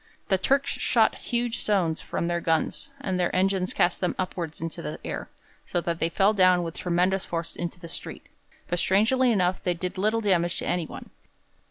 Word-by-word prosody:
The 190 Hz, -2 st, +3 dB
Turks 275 Hz, +8 st, +2 dB
shot -, -, +3 dB, 0.2 s
huge 240 Hz, -1 st, 0 dB
stones 180 Hz, -6 st, +1 dB
from -, -, -3 dB
their 170 Hz, 0 st, 0 dB
guns, 165 Hz, -, 0 dB
and 190 Hz, -8 st, -2 dB
their 175 Hz, 0 st, +1 dB
engines 190 Hz, 0 st, +1 dB
cast 175 Hz, -, +1 dB
them 180 Hz, -, 0 dB
upwards 175 Hz, -3 st, -3 dB
into 165 Hz, 0 st, -5 dB
the 75 Hz, +1 st, -5 dB
air, -, -, -4 dB, 0.3 s
so 175 Hz, -, -1 dB
that 170 Hz, -1 st, -2 dB
they 165 Hz, -, +1 dB
fell 195 Hz, +4 st, +3 dB
down 185 Hz, -3 st, +5 dB
with 165 Hz, -1 st, -5 dB
tremendous 180 Hz, +2 st, +1 dB
force 165 Hz, -1 st, -4 dB
into 175 Hz, +1 st, -4 dB
the 170 Hz, -, -9 dB
street, 165 Hz, -, -7 dB, 0.4 s
but 175 Hz, -, -1 dB
strangely 240 Hz, +8 st, +3 dB
enough 185 Hz, -4 st, +1 dB
they 180 Hz, -1 st, +1 dB
did 180 Hz, +2 st, -4 dB
little 215 Hz, +3 st, +2 dB
damage 175 Hz, -4 st, +1 dB
to -, -, -3 dB
anyone. 175 Hz, -3 st, -3 dB
180 Hz, 190 wpm, -26 LUFS, 170-195 Hz, 0.4 s, down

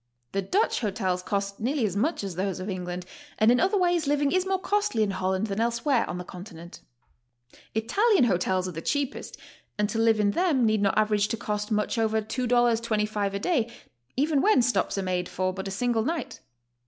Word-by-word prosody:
The 195 Hz, -, 0 dB
Dutch 385 Hz, -, +1 dB
hotels 190 Hz, -5 st, -1 dB
cost 200 Hz, +1 st, -3 dB
nearly 250 Hz, +2 st, 0 dB
as 195 Hz, -3 st, -2 dB
much 260 Hz, +5 st, 0 dB
as 195 Hz, -2 st, -4 dB
those 190 Hz, +1 st, -2 dB
of 190 Hz, +2 st, -4 dB
England, 180 Hz, -1 st, -5 dB, 0.3 s
and 215 Hz, +2 st, +5 dB
in 245 Hz, -, +3 dB
other 390 Hz, +3 st, +2 dB
ways 350 Hz, -4 st, +1 dB
living 285 Hz, 0 st, +2 dB
is 370 Hz, +1 st, +1 dB
more 385 Hz, 0 st, +1 dB
costly 405 Hz, -, 0 dB
in 205 Hz, -, 0 dB
Holland 190 Hz, +1 st, -1 dB
than 200 Hz, -1 st, -3 dB
elsewhere 235 Hz, +2 st, +1 dB
on 180 Hz, -, -3 dB
the 180 Hz, -, -5 dB
Continent. 175 Hz, -2 st, -10 dB, 1.0 s
Italian 390 Hz, -, +3 dB
hotels 185 Hz, -3 st, +1 dB
are -, -, -4 dB
the 165 Hz, -1 st, -6 dB
cheapest, 285 Hz, -, -2 dB, 0.4 s
and 210 Hz, 0 st, +1 dB
to 225 Hz, -, -2 dB
live 225 Hz, -1 st, +3 dB
in 205 Hz, -1 st, +3 dB
them 310 Hz, -, +2 dB
need 215 Hz, -1 st, +2 dB
not 200 Hz, -1 st, +1 dB
average 210 Hz, -1 st, +2 dB
to 230 Hz, -, -3 dB
cost 210 Hz, -1 st, -3 dB
much 210 Hz, +1 st, 0 dB
over 220 Hz, 0 st, +2 dB
$2.25 225 Hz, -3 st, 0 dB
a -, -, -1 dB
day, 240 Hz, -, 0 dB, 0.5 s
even 290 Hz, +1 st, +2 dB
when 415 Hz, -, +4 dB
stops 240 Hz, -3 st, 0 dB
are 195 Hz, -, -1 dB
made 180 Hz, -1 st, -2 dB
for 185 Hz, 0 st, -1 dB
but 190 Hz, +1 st, -5 dB
a -, -, -4 dB
single 230 Hz, +2 st, 0 dB
night. 325 Hz, +6 st, -3 dB
220 Hz, 200 wpm, -26 LUFS, 195-260 Hz, 1.0 s, and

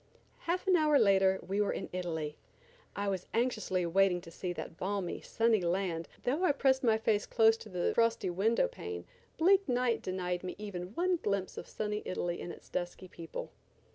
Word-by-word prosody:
Half 350 Hz, +2 st, -2 dB
an 375 Hz, -2 st, +4 dB
hour 305 Hz, -3 st, +4 dB
later 195 Hz, -4 st, +4 dB
we 200 Hz, +2 st, +1 dB
were 205 Hz, -, +1 dB
in 190 Hz, -, -4 dB
Italy. 160 Hz, -4 st, -3 dB, 0.6 s
I 200 Hz, 0 st, -2 dB
was 190 Hz, -2 st, -2 dB
anxiously 215 Hz, -7 st, 0 dB
waiting 180 Hz, +1 st, +3 dB
to 165 Hz, -, -12 dB
see 180 Hz, +1 st, -4 dB
that 170 Hz, -, -7 dB
balmy, 190 Hz, 0 st, -3 dB
sunny 225 Hz, -3 st, +2 dB
land, 170 Hz, -2 st, -1 dB
but -, -, -27 dB
though 285 Hz, +9 st, 0 dB
I 300 Hz, -, +4 dB
pressed 265 Hz, -1 st, +2 dB
my 225 Hz, -3 st, +4 dB
face 220 Hz, -1 st, +1 dB
close 225 Hz, -1 st, +5 dB
to 220 Hz, -, -11 dB
the 180 Hz, -2 st, 0 dB
frosty 230 Hz, -5 st, +2 dB
window 220 Hz, -, +2 dB
pane 435 Hz, -3 st, -7 dB, 0.3 s
bleak 380 Hz, +1 st, +4 dB
night 245 Hz, -2 st, +1 dB
denied 180 Hz, -1 st, -2 dB
me 180 Hz, -, -5 dB
even 195 Hz, -2 st, -6 dB
one 360 Hz, +1 st, +2 dB
glimpse 200 Hz, -, -2 dB
of -, -, -7 dB
sunny 210 Hz, 0 st, -3 dB
Italy 175 Hz, -1 st, -3 dB
and 175 Hz, -, -5 dB
its -, -, -12 dB
dusky 175 Hz, +1 st, -4 dB
people. 165 Hz, -2 st, -7 dB
200 Hz, 190 wpm, -32 LUFS, 180-245 Hz, 0.6 s, close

